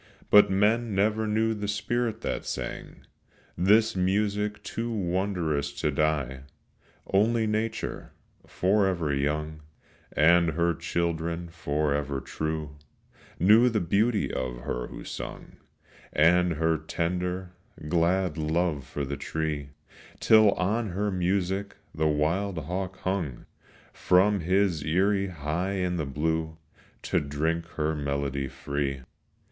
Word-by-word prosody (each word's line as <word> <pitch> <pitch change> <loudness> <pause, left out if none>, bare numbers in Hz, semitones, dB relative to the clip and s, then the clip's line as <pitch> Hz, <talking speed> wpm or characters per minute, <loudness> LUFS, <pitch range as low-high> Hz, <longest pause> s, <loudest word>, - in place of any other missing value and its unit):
But 105 0 +8
men 105 +3 +2
never 110 +2 +1
knew 110 +1 +1
the 105 -1 -4
spirit 110 +2 -1
that - - -3
sang - - -6 0.5
This 105 +5 +4
music 105 +3 0
too 115 +1 -4
wondrous 90 -8 -1
to 75 +1 -1
die. 70 -3 0 0.7
Only 110 +3 +2
nature, 110 +1 -3 0.4
forever 95 -5 +1
young, 75 +2 -2 0.5
And 85 +1 +4
her 85 +2 +2
children, 85 +1 -2
forever 75 -3 -1
true, 80 0 -4 0.6
Knew 110 +7 +6
the 110 -2 0
beauty 105 +5 +1
of 60 -1 -3
her - - -3
who - - -9
sung - - -8 0.5
And 90 +3 +4
her 80 0 +1
tender, 90 +2 -2 0.4
glad 85 0 +1
love 80 -3 0
for 70 - -3
the 70 +1 -4
tree; 75 -3 -3 0.5
Till 110 -2 +6
on 105 +4 -1
her 105 +2 -1
music 95 +2 -1 0.2
the 80 0 +1
wild 85 +6 0
hawk 95 +3 -4
hung 90 -10 -2 0.5
From 100 +3 +3
his 90 -2 +1
eyrie 95 +4 +2
high 85 +3 -2
in 90 -2 -1
the 75 -4 -2
blue 80 +3 -2 0.5
To - - +1
drink 80 +4 -2
her 75 0 0
melody 70 -2 -2
free. 70 0 -3
85 Hz, 120 wpm, -27 LUFS, 75-100 Hz, 0.7 s, But